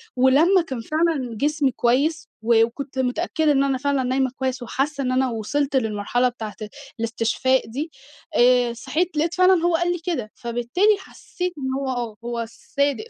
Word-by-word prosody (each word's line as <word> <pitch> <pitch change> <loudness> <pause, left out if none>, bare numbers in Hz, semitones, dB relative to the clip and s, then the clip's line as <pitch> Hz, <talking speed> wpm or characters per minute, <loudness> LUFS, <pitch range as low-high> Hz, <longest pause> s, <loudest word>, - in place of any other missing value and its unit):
ولمّا 290 +9 +5
كان 260 -8 -5
فعلًا 305 -5 -1
جسمي 290 -1 +1
كويس، 285 +7 +1
و 225 0 +4
وكنت 265 +3 -7
متأكدة 310 +4 +1
إن 275 -1 +3
أنا 270 -1 +1
فعلًا 280 0 0
نايمة 260 0 0
كويس، 260 -1 -2
وحاسّة 275 +3 -2
إن 255 - 0
أنا 260 0 +2
وصلت 275 +6 -2
للمرحلة 225 +1 +1
بتاعة 220 -4 -7 0.4
الإستشفاء 230 +3 +1
دي، 290 +8 -4 0.4
آآ 245 -1 +4
صحيت 315 +7 -2
لاقيت 325 +3 +1
فعلًا 365 -1 +4
هو 345 -1 +3
قال 345 +1 +1
لي 350 - -2
كده. 255 -12 -2
فبالتالي 240 - +1
حسّيت 360 -1 -6
إن 265 -2 -3
هو 275 - -3
آه، 240 -4 -3
هو 235 -1 -2
صادق 280 - -2
265 Hz, 165 wpm, -23 LUFS, 240-310 Hz, 0.4 s, ولمّا